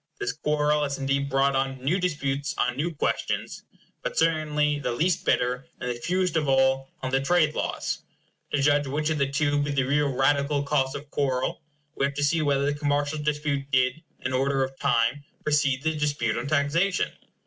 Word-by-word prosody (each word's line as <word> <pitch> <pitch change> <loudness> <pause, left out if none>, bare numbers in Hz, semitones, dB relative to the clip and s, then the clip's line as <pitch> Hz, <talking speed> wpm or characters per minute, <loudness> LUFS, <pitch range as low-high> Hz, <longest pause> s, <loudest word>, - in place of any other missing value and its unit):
This 405 0 -1
quarrel 150 - +1
has 140 -1 -1
indeed 140 +1 0
brought 135 0 +2
on 135 0 0
new 145 +9 0
disputes 145 -5 -1
on 125 0 +1
new 155 +6 -1
questions; 155 - -2 0.4
but - - -4
certainly 150 -2 +2
the 125 -3 -2
least 170 +7 +1
bitter, 125 +2 +1
and 125 -1 -2
the - - -1
fewest 180 +4 0
of 155 -2 +1
all, 135 0 +3
on 130 - -2
the 135 +1 +2
trade 155 +1 +3
laws. - - -2 0.5
To 145 - +1
judge 145 0 +3
which 150 +3 -1
of 155 - -1
the 140 -1 +1
two 145 +1 +1
be 145 - -1
the 140 -2 +1
real 145 +2 +2
radical 140 +2 +2
cause 135 -2 0
of 145 +1 -8
quarrel, 130 -2 -1 0.3
we 135 - 0
have 140 0 -3
to 145 - -1
see 160 +3 +2
whether 140 -2 +1
the 145 - +1
commercial 145 +1 0
dispute 150 -2 -1
did, 130 +2 +2 0.2
in 130 - -2
order 135 +1 +1
of 135 0 -6
time, 125 +1 +1 0.2
precede 145 -3 +1
the 160 0 +1
dispute 145 -7 0
on 120 +4 -3
taxation? 155 +6 +1
145 Hz, 190 wpm, -26 LUFS, 135-150 Hz, 0.5 s, all